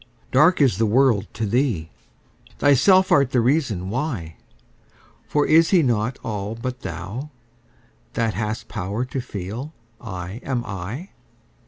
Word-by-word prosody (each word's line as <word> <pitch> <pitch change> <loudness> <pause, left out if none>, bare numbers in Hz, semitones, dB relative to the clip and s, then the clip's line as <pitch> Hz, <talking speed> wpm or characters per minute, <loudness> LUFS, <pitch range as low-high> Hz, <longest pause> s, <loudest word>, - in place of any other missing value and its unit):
Dark 155 +7 +5
is 125 -9 +3
the 115 - +3
world 120 -2 +3
to 110 - -1
thee: 105 - 0 0.7
thyself 185 +7 +5
art 140 -3 +5
the 130 - +2
reason 115 - +1
why; 120 - -3 0.9
For 145 -1 +2
is 160 +1 +5
He 180 -4 +4
not 120 -1 0
all 105 0 -4
but 125 +2 -5
thou, 120 - -6 0.8
that 115 -2 0
hast 105 0 -3
power 105 +4 -3
to 130 +1 -4
feel 120 - -6 0.3
'I 95 -1 -6
am 125 -3 -2
I'? 110 - -6
120 Hz, 135 wpm, -22 LUFS, 105-140 Hz, 0.9 s, Dark